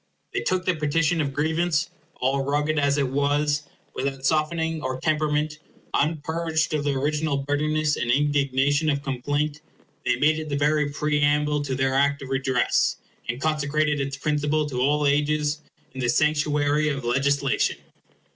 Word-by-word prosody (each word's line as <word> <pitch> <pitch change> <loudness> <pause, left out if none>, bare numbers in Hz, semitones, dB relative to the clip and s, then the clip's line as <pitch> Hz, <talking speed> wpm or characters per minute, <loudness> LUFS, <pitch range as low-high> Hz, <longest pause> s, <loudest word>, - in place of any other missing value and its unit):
—They - - 0
took 185 0 -1
the 185 - +2
petition 155 +1 +1
of 140 -2 -1
grievance, 160 +3 0 0.2
all 135 +2 0
rugged 150 +2 0
as 140 0 +2
it 140 -3 +1
was, 145 +2 +1 0.3
without 135 0 -3
softening 160 +2 0
or 130 -2 -3
temperament, 150 0 0 0.3
unpurged 160 +1 0
of 150 -1 0
the 145 -1 0
original 150 +1 0
bitterness 150 +2 0
and 120 - -2
indignation 140 +2 +2
of 140 -1 -1
complaint—they 145 0 -3
made 155 +5 +2
it 155 -1 -6
the 140 - -1
very 150 0 +2
preamble 150 0 +1
to 135 -2 -3
their 130 0 +1
Act 140 +1 +2
of 130 - -8
redress, 130 -1 +1 0.3
and 120 +2 -2
consecrated 150 0 0
its 140 0 -3
principle 150 +1 0
to 125 -2 -2
all 145 +2 +2
ages 150 +1 +1 0.3
in 130 - -8
the 120 -1 0
sanctuary 150 +1 +2
of 135 -4 -3
legislation. 140 +2 +1
145 Hz, 150 wpm, -24 LUFS, 140-155 Hz, 0.3 s, the